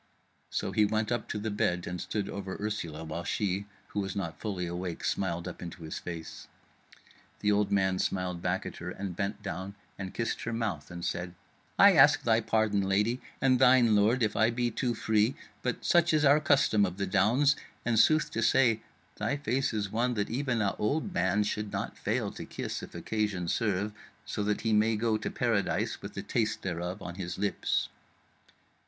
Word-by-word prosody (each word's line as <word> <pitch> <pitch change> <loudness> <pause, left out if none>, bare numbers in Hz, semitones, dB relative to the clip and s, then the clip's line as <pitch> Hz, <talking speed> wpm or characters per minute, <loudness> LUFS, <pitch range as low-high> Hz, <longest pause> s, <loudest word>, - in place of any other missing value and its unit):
So - - -2
he 105 - +3
went 110 +1 0
up 120 -2 -2
to - - -2
the 105 +1 -3
bed 90 -3 0
and 90 0 -4
stood 105 -2 -2
over 95 -1 -5
Ursula, 85 -7 -3
while 80 +2 -5
she, 100 +2 -1 0.2
who - - -3
was 95 -2 -3
not 90 -5 -4
fully 95 -5 -3
awake, 85 0 -4
smiled 85 -2 -1
up 90 - -7
into 90 0 -8
his 80 - -5
face. 85 -2 -7 0.9
The 105 - +3
old 105 0 +2
man 95 -2 +2
smiled 90 -2 -1
back 95 +3 -1
at - - -6
her 90 - -6
and 95 -1 -5
bent 100 +2 -3
down 95 0 -5 0.2
and 95 -2 -4
kissed 115 -1 -2
her 115 - -3
mouth, 105 -11 -2
and 85 0 -6
said: 90 0 -3 0.4
"I - - +8
ask - - +6
thy 115 -1 +3
pardon, 110 -2 +1
lady, 105 +6 +1 0.2
and 130 -2 +3
thine, 125 -2 +6
my 105 - +5
lord, 115 +4 +3
if 110 - +1
I 110 +1 +4
be 120 0 0
too 120 +2 -1
free, 110 +3 +2 0.3
but 125 - -3
such 175 -1 +4
is 150 -1 +3
our 145 +2 +6
custom 140 -8 +3
of 90 -2 -1
the 100 - -1
Downs; 115 +10 +3 0.3
and 115 -2 +2
sooth 155 +4 +4
to 115 - -2
say 115 -1 +4 0.4
thy 145 - -1
face 135 0 0
is 105 -3 -2
one 120 +2 +1
that 100 -1 -1
even 125 -3 0
a 100 -3 +1
old 155 - -1
man 105 - +2
should 105 0 -3
not - - -3
fail - - -1
to - - -7
kiss - - -5
if - - -10
occasion 105 -5 -2
serve, 105 +1 0 0.3
so - - -3
that 105 0 0
he 115 -1 +1
may 110 +1 +3
go 110 +1 +1
to - - -3
paradise 115 -5 0
with - - -8
the - - -4
taste 110 -3 -1
thereof 90 +2 -3
on 90 - -5
his 90 0 -4
lips." 100 +1 0
105 Hz, 200 wpm, -30 LUFS, 95-115 Hz, 0.9 s, I